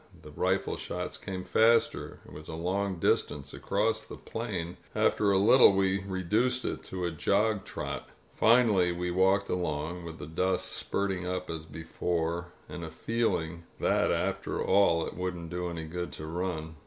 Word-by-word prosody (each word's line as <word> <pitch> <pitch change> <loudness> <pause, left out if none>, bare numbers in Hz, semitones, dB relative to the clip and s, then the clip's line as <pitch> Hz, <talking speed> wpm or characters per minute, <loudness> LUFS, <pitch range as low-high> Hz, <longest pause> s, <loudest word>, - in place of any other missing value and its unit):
The - - -11
rifle - - 0
shots - - -4
came 95 -1 -5
faster. 115 +3 +2
It - - -13
was 75 +1 -10
a 80 - -5
long 95 +3 -1
distance 75 -3 0
across 110 +3 0
the - - -10
plain. 90 -7 -4 0.2
After 100 -1 +3
a 95 - +4
little 105 +3 +7
we 95 0 +2
reduced 105 +7 0
it - - -2
to 90 -1 -4
a 85 - -1
jog 100 +6 +1
trot. - - -5 0.2
Finally 110 -6 +4
we 90 0 -2
walked 95 +2 +3
along, 85 -1 -2
with 80 -1 -7
the - - -7
dust 90 +4 0
spurting 95 -2 -1
up 90 -1 -3
as 80 -1 -6
before, 85 +1 -2 0.2
and 85 - -7
a 80 - -5
feel 115 +8 0
ing 85 +1 -7
that, - - +2
after - - -1
all, 95 -4 +3
it - - -6
wouldn't 90 -2 -4
do 90 0 -2
any 85 -1 -5
good 90 +2 -4
to 75 - -7
run. 80 -1 -4
90 Hz, 170 wpm, -29 LUFS, 85-100 Hz, 0.2 s, little